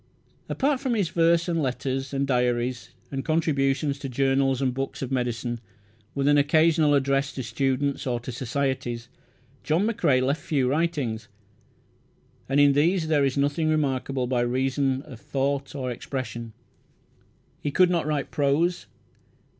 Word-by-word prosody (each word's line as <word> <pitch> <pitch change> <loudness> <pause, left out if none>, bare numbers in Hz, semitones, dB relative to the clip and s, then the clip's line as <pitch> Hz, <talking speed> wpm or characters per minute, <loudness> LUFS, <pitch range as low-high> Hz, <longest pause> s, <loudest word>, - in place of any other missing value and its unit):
Apart 275 0 +1
from 260 -3 -1
his 200 -7 0
verse, 170 0 +3
and 165 -2 0
letters, 135 0 -2
and 140 0 0
diaries, 125 -1 0 0.2
and 135 -1 -3
contributions 140 -3 +1
to 135 - -5
journals 135 0 +1
and 130 -2 0
books 135 +1 -4
of 130 - -5
medicine, 120 -2 -2 0.6
with 140 0 0
an 145 0 +5
occasional 155 +1 +4
address 140 0 +1
to 130 - -4
students 135 +4 -1
or 120 -1 0
to 125 - -6
societies, 125 -1 -2 0.5
John 165 +6 +1
McCrae 165 - +2
left 140 +4 0
few 140 -5 0
writings, 135 -7 -1 1.2
and 135 +1 +3
in 145 -1 +6
these 160 +3 +2
there 150 -3 +3
is 135 0 0
nothing 145 +3 +1
remarkable 135 -4 0
by 125 -1 0
reason 130 +2 0
of 125 - -11
thought 140 0 -2
or 130 -3 -3
expression. 120 -3 -5 1.1
He 145 - -1
could 180 +5 +4
not 170 -4 0
write 150 -2 -2
prose. 150 +5 +1
140 Hz, 145 wpm, -25 LUFS, 130-150 Hz, 1.2 s, in